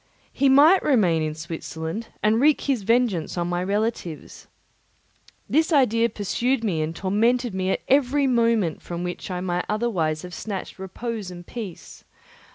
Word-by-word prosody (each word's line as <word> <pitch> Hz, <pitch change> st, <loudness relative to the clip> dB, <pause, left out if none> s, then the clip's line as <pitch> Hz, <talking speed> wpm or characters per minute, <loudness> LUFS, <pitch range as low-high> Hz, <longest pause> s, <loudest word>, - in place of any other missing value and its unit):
He 275 Hz, 0 st, +3 dB
might 300 Hz, +8 st, +6 dB
remain 190 Hz, -, +2 dB
in 155 Hz, -1 st, -2 dB
Switzerland 160 Hz, +4 st, -6 dB, 0.2 s
and 220 Hz, +2 st, +3 dB
wreak 300 Hz, +1 st, +4 dB
his 270 Hz, -6 st, 0 dB
vengeance 220 Hz, -6 st, +1 dB
on 175 Hz, 0 st, -1 dB
my 175 Hz, 0 st, -1 dB
relatives. 200 Hz, -4 st, -3 dB, 1.0 s
This 320 Hz, +3 st, +2 dB
idea 235 Hz, -6 st, +3 dB
pursued 230 Hz, +5 st, -1 dB
me 175 Hz, -8 st, 0 dB
and 155 Hz, +2 st, -3 dB
tormented 230 Hz, +5 st, +1 dB
me 190 Hz, 0 st, -1 dB
at -, -, 0 dB
every 275 Hz, +1 st, +3 dB
moment 230 Hz, -, +1 dB
from 175 Hz, 0 st, -5 dB
which 180 Hz, +2 st, -5 dB
I 180 Hz, -1 st, -3 dB
might 180 Hz, -1 st, -2 dB
otherwise 185 Hz, -9 st, -1 dB
have 180 Hz, -1 st, -9 dB
snatched 195 Hz, -2 st, -6 dB
repose 210 Hz, +2 st, -5 dB
and 175 Hz, -1 st, -10 dB
peace. 210 Hz, -7 st, -8 dB
210 Hz, 155 wpm, -24 LUFS, 175-240 Hz, 1.0 s, might